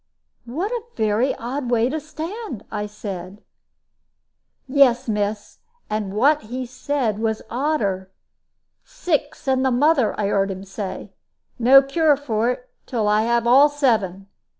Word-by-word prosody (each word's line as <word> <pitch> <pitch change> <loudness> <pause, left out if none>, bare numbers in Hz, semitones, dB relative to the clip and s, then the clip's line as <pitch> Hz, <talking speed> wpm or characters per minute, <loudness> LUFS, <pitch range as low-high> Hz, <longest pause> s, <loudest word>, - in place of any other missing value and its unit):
"What 340 - -3
a 485 -2 -2
very 220 +4 +1
odd 250 +2 -4
way 235 -1 +2
to 310 +5 -2
stand!" 315 - -7
I 210 -1 -3
said. 200 -2 -8 1.2
"Yes, 260 -3 +4
miss. 210 -1 -2 0.3
And 210 -2 -2
what 290 +7 +4
he 250 +4 -5
said 255 -3 -2
was 220 -1 -1
odder. 225 -9 -1 0.7
'Six, 330 - -3
and 260 0 +2
the 265 - +3
mother!' 260 -2 +2
I - - 0
heared 200 -1 +1
un 190 0 -6
say; 195 0 -6 0.5
'no 265 +3 +7
cure 295 +1 +2
for 235 -5 -1
it, 250 0 -4 0.2
till 225 -4 -1
I 210 +1 +3
have 235 0 +1
all 270 +5 +6
seven.' 220 -10 0
240 Hz, 140 wpm, -22 LUFS, 210-285 Hz, 1.2 s, no